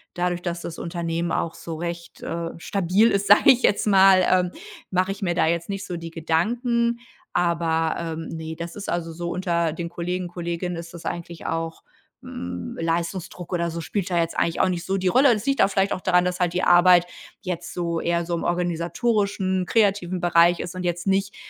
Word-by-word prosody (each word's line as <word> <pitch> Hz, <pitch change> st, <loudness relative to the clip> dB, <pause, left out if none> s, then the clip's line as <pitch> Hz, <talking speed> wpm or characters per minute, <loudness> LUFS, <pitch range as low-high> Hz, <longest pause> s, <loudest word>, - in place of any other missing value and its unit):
dadurch, 175 Hz, 0 st, -1 dB
dass 170 Hz, -1 st, -3 dB
das 170 Hz, -, -7 dB
Unternehmen 170 Hz, -1 st, -3 dB
auch 165 Hz, 0 st, -1 dB
so 165 Hz, -, -7 dB
recht, 170 Hz, +1 st, -6 dB
äh, 170 Hz, 0 st, -3 dB
stabil 195 Hz, +5 st, +2 dB
ist, 200 Hz, 0 st, 0 dB
sage 205 Hz, +7 st, +8 dB
ich 255 Hz, -1 st, +2 dB
jetzt 205 Hz, -, +2 dB
mal, 190 Hz, -2 st, +6 dB
ähm, 180 Hz, -1 st, +2 dB, 0.4 s
mache 185 Hz, +1 st, +1 dB
ich 195 Hz, -, -7 dB
mir 175 Hz, -3 st, 0 dB
da -, -, +3 dB
jetzt 170 Hz, +2 st, -1 dB
nicht 195 Hz, 0 st, -4 dB
so 175 Hz, -, -5 dB
die 165 Hz, 0 st, -7 dB
Gedanken. 235 Hz, +9 st, 0 dB, 0.3 s
Aber, 165 Hz, -2 st, +1 dB
ähm, 165 Hz, -1 st, -5 dB
ne, 160 Hz, 0 st, -6 dB
das 170 Hz, +1 st, -7 dB
ist 205 Hz, -, -6 dB
also 165 Hz, -1 st, -2 dB
so 170 Hz, +1 st, -4 dB
unter 170 Hz, -3 st, 0 dB
den 170 Hz, +2 st, -5 dB
Kollegen, 180 Hz, +1 st, -3 dB
Kolleginnen 175 Hz, 0 st, -4 dB
ist 170 Hz, 0 st, -8 dB
das 170 Hz, -, -10 dB
eigentlich 170 Hz, -1 st, -6 dB
auch, 165 Hz, 0 st, -3 dB, 0.4 s
hm, 90 Hz, -1 st, -6 dB
Leistungsdruck 170 Hz, +2 st, -3 dB
oder 170 Hz, -1 st, 0 dB
so 170 Hz, 0 st, -5 dB
spielt 195 Hz, +3 st, -3 dB
da 175 Hz, -, 0 dB
jetzt 165 Hz, 0 st, 0 dB
eigentlich 165 Hz, -, 0 dB
auch 190 Hz, -, +3 dB
nicht 175 Hz, -2 st, -2 dB
so 195 Hz, +1 st, 0 dB
die 185 Hz, -1 st, -1 dB
Rolle. 260 Hz, +8 st, +5 dB
Das 215 Hz, -1 st, -1 dB
liegt 275 Hz, -1 st, +2 dB
auch -, -, +6 dB
vielleicht 195 Hz, 0 st, +1 dB
auch -, -, -5 dB
daran, 180 Hz, -1 st, +3 dB
dass 180 Hz, +1 st, -2 dB
halt 175 Hz, -2 st, +1 dB
die 180 Hz, -, -1 dB
Arbeit 175 Hz, 0 st, +6 dB, 0.4 s
jetzt 180 Hz, -3 st, -5 dB
so 170 Hz, -1 st, -1 dB
eher 170 Hz, 0 st, 0 dB
so 175 Hz, -, -3 dB
im 170 Hz, -, -2 dB
organisatorischen, 185 Hz, +2 st, 0 dB
kreativen 195 Hz, -5 st, +1 dB
Bereich 175 Hz, 0 st, +4 dB
ist 175 Hz, -, -5 dB
und 185 Hz, -, -5 dB
jetzt 175 Hz, -1 st, -2 dB
nicht, 195 Hz, 0 st, 0 dB
175 Hz, 205 wpm, -24 LUFS, 170-190 Hz, 0.4 s, sage